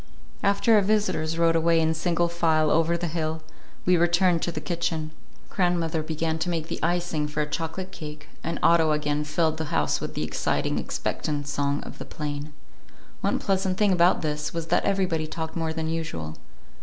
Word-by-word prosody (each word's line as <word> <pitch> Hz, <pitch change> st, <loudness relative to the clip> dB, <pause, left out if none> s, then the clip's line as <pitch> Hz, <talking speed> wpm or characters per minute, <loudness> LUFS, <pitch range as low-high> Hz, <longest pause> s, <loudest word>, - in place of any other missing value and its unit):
After 200 Hz, +3 st, +3 dB
our 210 Hz, -, +7 dB
visitors 185 Hz, -6 st, +1 dB
rode 165 Hz, 0 st, +4 dB
away 165 Hz, 0 st, +4 dB
in 160 Hz, 0 st, +2 dB
single 170 Hz, +1 st, +1 dB
file 160 Hz, -3 st, +2 dB
over 165 Hz, +1 st, +3 dB
the 175 Hz, -, -3 dB
hill, 160 Hz, -1 st, -2 dB, 0.4 s
we 180 Hz, -, +5 dB
returned 175 Hz, 0 st, +3 dB
to 175 Hz, -, -1 dB
the 155 Hz, -, -4 dB
kitchen. 160 Hz, 0 st, -2 dB, 0.4 s
Grandmother 170 Hz, -3 st, +1 dB
began 160 Hz, +1 st, -2 dB
to 160 Hz, -, -1 dB
make 165 Hz, -1 st, -2 dB
the -, -, -3 dB
icing 170 Hz, -3 st, 0 dB
for 150 Hz, +1 st, -2 dB
a -, -, +1 dB
chocolate 170 Hz, +5 st, -4 dB
cake, 150 Hz, -3 st, -8 dB, 0.2 s
and 165 Hz, -, -2 dB
Otto 165 Hz, -2 st, +5 dB
again 150 Hz, 0 st, 0 dB
filled 155 Hz, +1 st, 0 dB
the 160 Hz, -, -2 dB
house 75 Hz, -, 0 dB
with -, -, -5 dB
the -, -, -1 dB
exciting, -, -, 0 dB
expectant 145 Hz, -2 st, -2 dB
song 145 Hz, 0 st, -1 dB
of -, -, -10 dB
the -, -, -6 dB
plane. 150 Hz, 0 st, -5 dB, 0.7 s
One -, -, +1 dB
pleasant 190 Hz, -2 st, 0 dB
thing 210 Hz, -2 st, +3 dB
about 175 Hz, -1 st, +4 dB
this 150 Hz, -1 st, -1 dB
time -, -, -7 dB
was 165 Hz, -1 st, -3 dB
that 175 Hz, -, +2 dB
everybody 180 Hz, -5 st, +1 dB
talked 160 Hz, 0 st, -5 dB
more 165 Hz, -1 st, -1 dB
than 160 Hz, 0 st, -3 dB
usual. 85 Hz, -, -3 dB
165 Hz, 190 wpm, -26 LUFS, 155-175 Hz, 0.7 s, our